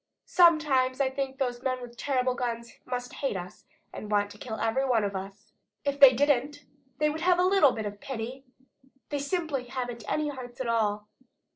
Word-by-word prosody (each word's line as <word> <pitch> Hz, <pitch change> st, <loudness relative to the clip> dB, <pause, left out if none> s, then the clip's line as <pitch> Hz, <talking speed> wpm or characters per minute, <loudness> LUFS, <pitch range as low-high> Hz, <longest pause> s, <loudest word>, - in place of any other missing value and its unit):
Sometimes 300 Hz, -7 st, +4 dB
I 265 Hz, -1 st, +2 dB
think 270 Hz, 0 st, -3 dB
that 270 Hz, -, +1 dB
those 245 Hz, -1 st, -5 dB
men 255 Hz, -1 st, -1 dB
with 240 Hz, -1 st, -10 dB
terrible 255 Hz, +1 st, 0 dB
guns 235 Hz, -1 st, -4 dB
must 245 Hz, -1 st, -4 dB
hate 270 Hz, -8 st, -2 dB
us 180 Hz, 0 st, -9 dB, 0.3 s
and 210 Hz, -, -7 dB
want 205 Hz, -1 st, +1 dB
to 205 Hz, -, -13 dB
kill 220 Hz, -3 st, -6 dB
every 225 Hz, +4 st, +1 dB
one 245 Hz, -5 st, +2 dB
of 200 Hz, -1 st, -2 dB
us. 195 Hz, +3 st, -8 dB, 0.3 s
If 280 Hz, 0 st, -1 dB
they 275 Hz, -2 st, +10 dB
didn't, 285 Hz, +2 st, +1 dB, 0.3 s
they 300 Hz, 0 st, +2 dB
would 315 Hz, +1 st, -5 dB
have 360 Hz, 0 st, +4 dB
a 360 Hz, -, +3 dB
little 370 Hz, -7 st, +5 dB
bit 220 Hz, -2 st, -4 dB
of 205 Hz, 0 st, -6 dB
pity. 260 Hz, +1 st, -5 dB, 0.7 s
They 290 Hz, -, -2 dB
simply 285 Hz, -3 st, -2 dB
haven't 245 Hz, -2 st, -5 dB
any 305 Hz, -1 st, 0 dB
hearts 250 Hz, -3 st, -8 dB
at 260 Hz, -, -2 dB
all." 210 Hz, -2 st, 0 dB
255 Hz, 195 wpm, -28 LUFS, 230-280 Hz, 0.7 s, they